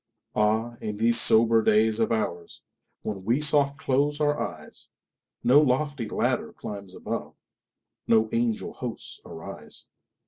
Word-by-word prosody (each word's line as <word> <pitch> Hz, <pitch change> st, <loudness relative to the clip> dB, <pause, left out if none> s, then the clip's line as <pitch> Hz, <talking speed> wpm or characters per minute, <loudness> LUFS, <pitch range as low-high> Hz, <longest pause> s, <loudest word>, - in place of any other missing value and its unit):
Ah, 110 Hz, +3 st, +1 dB
in 105 Hz, -1 st, -4 dB
these 115 Hz, +2 st, +4 dB
sober 115 Hz, 0 st, +5 dB
days 110 Hz, +1 st, +3 dB
of 115 Hz, -, +2 dB
oursWhen 90 Hz, -7 st, -3 dB, 0.6 s
we 115 Hz, +8 st, +1 dB
soft 145 Hz, -2 st, +2 dB
close 145 Hz, +3 st, 0 dB
our 150 Hz, 0 st, +1 dB
eyes, -, -, -7 dB, 0.6 s
No 135 Hz, +5 st, +6 dB
lofty 140 Hz, -3 st, 0 dB
ladder -, -, -1 dB
climbs 100 Hz, -2 st, -8 dB
above, -, -, -5 dB, 0.7 s
No 110 Hz, -1 st, +4 dB
angel 115 Hz, -1 st, -1 dB
hosts -, -, -7 dB
arise. -, -, -9 dB
115 Hz, 125 wpm, -26 LUFS, 110-140 Hz, 0.7 s, No